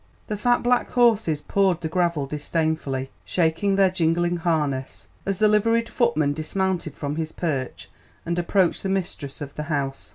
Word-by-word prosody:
The 210 - -3
fat 240 +4 +2
black 245 0 +2
horses 220 -11 +3
pawed 190 -2 +1
the 160 - -2
gravel 170 -3 0
disdainfully, 150 -2 -2
shaking 180 +4 +1
their 195 -1 +4
jingling 175 0 +1
harness, 150 -6 -1 0.2
as 195 -1 0
the 215 - +4
liveried 230 +2 +2
footman 155 - +1
dismounted 170 0 -2
from 145 +1 -4
his 160 -1 -2
perch 140 -7 -3 0.4
and 170 +1 -1
approached 175 0 +2
the 195 - -2
mistress 175 -8 -3
of 145 -1 -6
the - - -5
house. 140 -3 -2
170 Hz, 160 wpm, -24 LUFS, 150-195 Hz, 0.4 s, their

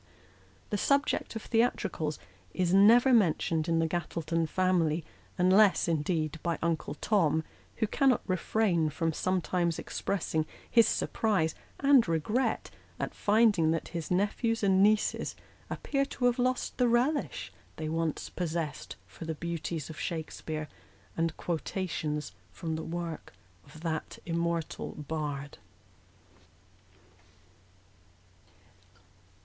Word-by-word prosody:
The 205 - 0
subject 280 -1 +1
of 225 - -5
theatricals 205 -9 0 0.4
is 180 -1 +1
never 235 +7 +7
mentioned 165 -6 +2
in 165 - +2
the 165 - +2
Gattleton 165 0 -1
family, 170 -4 +1 0.3
unless, 190 +2 +5
indeed, 160 0 0
by 170 -3 -1
Uncle 165 -2 -1
Tom, 160 -5 +2 0.3
who 220 - +1
cannot 260 +2 +2
refrain 185 -3 +1
from 165 +1 -1
some 185 +3 0
times 170 -2 0
expressing 160 -5 -2 0.2
his 230 -2 +5
surprise 190 -8 +1 0.3
and 275 -5 +5
regret 165 - 0 0.3
at - - -3
finding 205 -6 +3
that 165 0 -1
his 170 -3 -5
nephews 210 +5 0
and 190 -1 +4
nieces 215 +1 +2 0.3
appear 275 -1 -1
to 260 -2 -3
have 245 +1 +3
lost 255 +1 0
the 250 - +4
relish 250 +6 0 0.2
they 155 - -4
once 165 0 -1
possessed 165 -3 -4
for 165 - -10
the 160 0 -3
beauties 165 -2 -4
of 155 - -10
Shakspeare, 155 -1 -4 0.5
and 165 -1 -1
quotations 160 - -3 0.2
from 160 - -4
the 160 - -3
works 170 - -5 0.3
of 150 +2 -13
that 160 -2 -3
im 170 -1 -1
mortal 170 -1 -2
bard. 145 -2 -4
170 Hz, 120 wpm, -30 LUFS, 160-210 Hz, 0.5 s, never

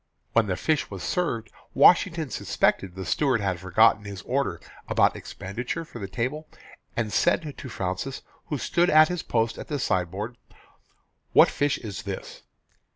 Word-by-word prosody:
When 115 -2 +3
the 95 - 0
fish 155 - 0
was 95 -3 -7
served 115 -12 -1 0.2
Washington 160 +1 +5
suspected 90 -2 0
the 95 0 -6
steward 135 -6 +1
had 95 -3 -1
forgotten 105 +4 +4
his 100 -1 -7
order 130 -10 -1 0.3
about - - +3
expenditure 120 - -5
for 120 - -10
the 100 - -5
table 130 +10 -3 0.5
and 110 -3 -1
said 150 -3 +1
to 130 - -8
Fraunces, 95 +7 -4 0.2
who 150 - -2
stood 175 +6 +1
at 155 0 +7
his 180 -2 -2
post 115 -1 -1
at - - -7
the 150 - -2
sideboard, 100 +1 -2 1.0
"What - - +7
fish 145 0 +1
is 105 -4 -6
this?" 100 -2 -7
115 Hz, 155 wpm, -26 LUFS, 100-145 Hz, 1.0 s, at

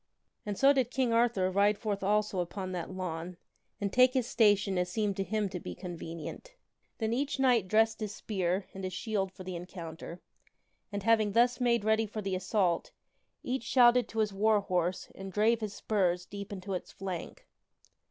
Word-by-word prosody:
And 205 -1 -2
so 275 +1 +6
did 260 -4 +1
King 255 -2 0
Arthur 230 -6 +2
ride 200 +2 +3
forth 205 -1 -3
also 205 -1 +1
upon 185 +2 -3
that 175 -2 -4
lawn, 180 -2 -5 0.4
and 200 -1 -2
take 255 +1 +5
his 255 -3 +2
station 205 -6 +3
as 180 0 0
seemed 210 -1 0
to 195 - 0
him 210 +1 -1
to 180 -1 -5
be - - -7
convenient. 175 - -7 0.4
Then 220 0 -1
each 280 +4 -1
knight 250 -7 +3
dressed 220 +2 +3
his 215 -1 -4
spear 190 -2 -1
and 195 - -7
his 185 0 -3
shield 195 -1 -2
for 185 0 -11
the 185 -1 -5
encounter, 170 -1 -8 0.7
and, 200 -1 -4
having 215 -2 +3
thus 240 +3 +3
made 235 -3 +2
ready 220 0 +2
for 215 +1 -5
the 195 -1 -2
assault, 185 -2 0 0.5
each 255 0 -2
shouted 240 0 +5
to 225 - -9
his 210 -2 0
war 210 +1 +3
horse 180 -2 -1
and 195 0 -8
drave 220 +3 +2
his 210 -2 -4
spurs 180 -4 0
deep 200 +1 -8
into 195 0 -5
its 180 - -5
flank. 185 -3 -6
205 Hz, 185 wpm, -31 LUFS, 185-225 Hz, 0.7 s, so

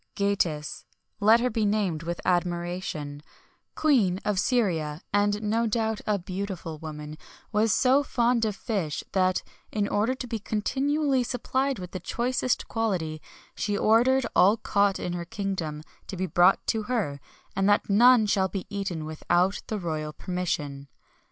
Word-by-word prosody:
Gatis 180 -7 -1 0.4
let 220 +3 +5
her 250 - +1
be 220 0 0
named 200 -6 0
with 170 +1 -4
admiration 175 -4 -2 0.5
Queen 225 -12 +3
of 210 -3 +1
Syria, 175 - 0
and 205 +1 +2
no 225 +2 +1
doubt 220 0 -1
a 210 -1 +2
beautiful 185 -3 -5
woman, 150 -1 -7 0.3
was 215 0 +2
so 265 +6 +4
fond 240 -3 +1
of 215 -3 0
fish 195 - -3
that, 185 -1 +2 0.3
in 205 -2 0
order 220 +6 +1
to 260 - -6
be 230 -2 -4
continually 270 +6 0
supplied 260 +2 -1
with 180 -1 -8
the 185 - -5
choicest 245 +6 -1
quality, 180 -9 -2 0.3
she 205 -1 -1
ordered 240 +5 +4
all 200 +5 +6
caught 200 -2 +1
in 175 - -3
her 175 -1 -3
kingdom 175 -6 -4 0.2
to 190 - -6
be 185 - -1
brought 175 +1 +4
to 225 - 0
her, 210 - -2 0.4
and 195 +1 +2
that 205 - +3
none 235 +3 +6
should 190 -2 +1
be 195 -3 -4
eaten 190 -6 -3
without 175 +5 0
the 215 - -2
royal 155 -4 -3
permission. 150 -6 -3
200 Hz, 150 wpm, -27 LUFS, 175-225 Hz, 0.5 s, all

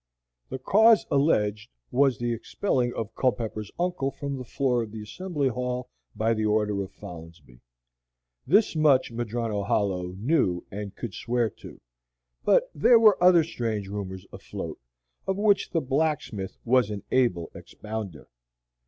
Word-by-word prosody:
The - - -4
cause 220 - +5
alleged 110 -7 +1 0.2
was 135 -2 +3
the 120 +1 -1
expelling 125 - -1
of 115 -1 -4
Culpepper's 110 -4 -1
uncle 175 -6 0
from 140 0 -5
the 130 - -6
floor 125 0 0
of 110 -2 -6
the 110 -1 -7
Assembly 150 - -2
Ball 125 0 -2 0.3
by 115 +1 +1
the 110 -1 -2
order 105 -1 +1
of 95 - -6
Folinsbee. 80 -7 -12 0.9
This 200 - +4
much 150 -6 +3
Madrono 115 -2 -2
Hollow 95 -3 -1
knew 105 - +1
and 100 0 -6
could 115 -5 -6
swear 120 -2 -1
to; - - -13 0.6
but - - +3
there 235 +11 +6
were 215 -5 +5
other 175 -2 +7
strange 115 -10 -3
rumors 95 -2 -6
afloat, - - -7 0.5
of 190 0 0
which 205 -1 +2
the 165 - 0
blacksmith 135 -8 -2
was 125 -2 +3
an 105 -2 -5
able 90 -11 +1
expounder. 105 -7 -7
120 Hz, 145 wpm, -26 LUFS, 105-140 Hz, 0.9 s, other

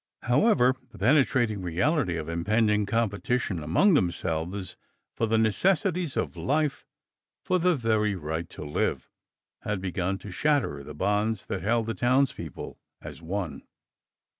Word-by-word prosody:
However, 130 - +4 0.2
the - - -15
penetrating 120 -3 +2
reality 95 - 0
of 80 -1 -5
impending 105 +5 +1
competition 105 -3 -1
among 90 - +3
themselves 90 - -1 0.4
for 115 - 0
the 110 +1 +2
necessities 175 - +1
of - - -1
life, 150 +1 0 0.6
for 185 - +2
the 180 0 +3
very 110 -5 +1
right 80 0 -4
to - - -8
live, 75 - -2 0.5
had 105 -2 -2
begun 95 +1 -2
to 100 0 -10
shatter 125 - 0
the 75 +1 -9
bonds 105 +4 0
that 95 - -4
held 115 +4 +1
the 115 - -2
townspeople 120 - -1 0.2
as - - -10
one. 85 -4 -4
105 Hz, 135 wpm, -27 LUFS, 90-130 Hz, 0.6 s, However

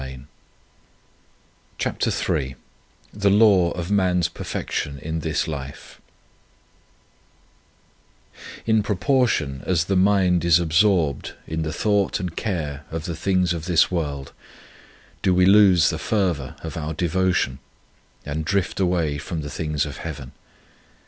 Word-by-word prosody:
22 65 0 -8 1.5
CHAPTER - - -1 0.2
III 65 -1 -2 0.6
THE 100 -1 +1
LAW 100 -4 +5
OF 85 +2 -5
MAN 95 -3 +2
S 85 - +1
PERFECTION 70 -3 -4
IN 80 +4 -4
THIS 80 0 -1
LIFE 70 -3 -8 2.6
IN 110 -1 +3
proportion 100 - 0
as 85 -3 +2
the 95 - 0
mind 95 -2 +3
is 85 0 +5
absorbed 85 -3 +1
in 80 0 -3
the 80 0 -2
thought 100 +1 +1
and 90 -2 -5
care 75 -9 -3
of 80 0 -5
the 85 - -4
things 90 0 +1
of 80 -2 -5
this 85 -1 +3
world 70 -6 -3 0.9
do 90 - +2
we 90 0 +4
lose 95 -4 +6
the - - -4
fervour 90 -11 -1
of 80 -3 -6
our 80 0 -4
devotion, 90 -6 0 0.7
and 75 +2 -3
drift 100 +3 -1
away 85 -6 0
from 80 +2 -5
the 75 0 -6
things 75 -3 -1
of 70 - -7
Heaven. 70 -6 -7
85 Hz, 130 wpm, -23 LUFS, 75-95 Hz, 2.6 s, lose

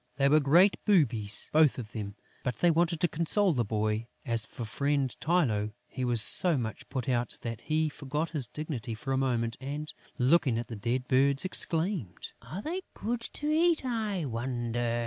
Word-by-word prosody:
They 140 - +2
were 155 +2 +5
great 170 +8 +4
boobies, 115 - +4
both 155 -2 +4
of 115 -4 -7
them; 100 -2 -6 0.3
but 125 - -2
they 175 +7 +3
wanted 170 0 +1
to 175 - +4
console 170 +4 +1
the 125 -4 0
boy. 110 +1 -2 0.2
As 115 -4 -1
for 120 - -7
friend 140 +2 -1
Tylô, 115 -12 +1
he 130 - -5
was 120 -3 +4
so 170 - +4
much 110 -3 -5
put 130 -4 -4
out 120 -2 -1
that 115 -1 -5
he 155 0 0
forgot 150 +3 -4
his 145 -7 0
dignity 125 -6 -5
for 135 +5 -4
a - - +1
moment 115 -3 -1
and, 145 +3 -5 0.2
looking 135 -2 +3
at 120 - -4
the 115 - -5
dead 120 +4 -2
birds, 135 +4 +2
exclaimed: 170 - -1
"Are 190 +6 -7
they 360 +4 -3
good 235 +2 -3
to 295 +1 -2
eat, 325 -2 +2
I 215 -8 -2
wonder?" 120 -1 -2
135 Hz, 185 wpm, -29 LUFS, 115-165 Hz, 0.3 s, were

